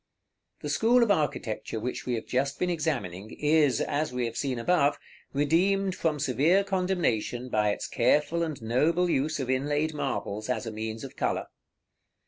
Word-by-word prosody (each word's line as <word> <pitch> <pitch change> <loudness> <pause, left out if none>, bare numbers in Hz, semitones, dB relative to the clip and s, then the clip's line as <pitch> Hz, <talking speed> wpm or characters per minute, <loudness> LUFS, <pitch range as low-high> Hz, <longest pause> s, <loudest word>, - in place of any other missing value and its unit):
§ - - -52
XXXIX. - - -42
The 150 - -3
school 235 +10 +4
of 225 - +2
architecture 115 - -1
which 125 +3 -4
we 125 - +1
have 110 - -5
just 135 +2 -1
been 180 0 0
examining 120 - -2
is, 150 -2 +3
as 150 0 -1
we 125 -1 -1
have 115 - -4
seen 135 -3 -1
above, 145 +3 +2 0.3
redeemed 185 +7 +2
from 160 -4 -1
severe 150 +9 +3
condemnation 175 - -1
by 105 -2 +2
its 105 - -2
careful 150 +7 +2
and 160 -4 -2
noble 160 +10 +2
use 150 +2 0
of 130 - -2
inlaid 145 +4 0
marbles 115 -6 -3
as 125 -2 -1
a 115 - -4
means 110 +1 -5
of 135 - -8
color. - - -1
145 Hz, 175 wpm, -28 LUFS, 120-165 Hz, 0.3 s, school